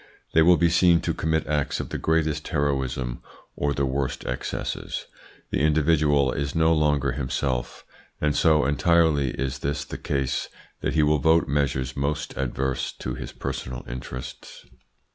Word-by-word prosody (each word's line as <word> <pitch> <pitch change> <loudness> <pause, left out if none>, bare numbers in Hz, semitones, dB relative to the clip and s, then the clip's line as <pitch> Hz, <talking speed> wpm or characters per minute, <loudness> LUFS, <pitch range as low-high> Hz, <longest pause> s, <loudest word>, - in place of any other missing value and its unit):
They 80 - +6
will 85 +2 +6
be 85 -1 +3
seen 85 0 +5
to - - -1
commit 80 -1 0
acts 75 -1 -1
of - - -4
the - - -4
greatest 80 -2 0
heroism 65 -5 -1 0.3
or 75 - 0
the 70 -1 0
worst 65 0 -2
excesses. 60 - -4 0.5
The - - 0
individual 75 -2 +3
is 70 +1 -3
no 80 0 +4
longer 75 -3 +2
himself, 65 -1 -2 0.3
and 75 -1 +1
so 75 -2 +4
entirely 75 -1 +3
is 65 0 -3
this 70 +2 -2
the - - -7
case 70 -2 -1 0.3
that - - -2
he 80 - +4
will 75 0 +3
vote 80 +2 +4
measures 65 -2 0
most 75 +2 -2
adverse 65 +1 -2
to 65 - -5
his - - -6
personal 65 -2 -5
interests. 65 0 -8
70 Hz, 155 wpm, -25 LUFS, 65-75 Hz, 0.5 s, They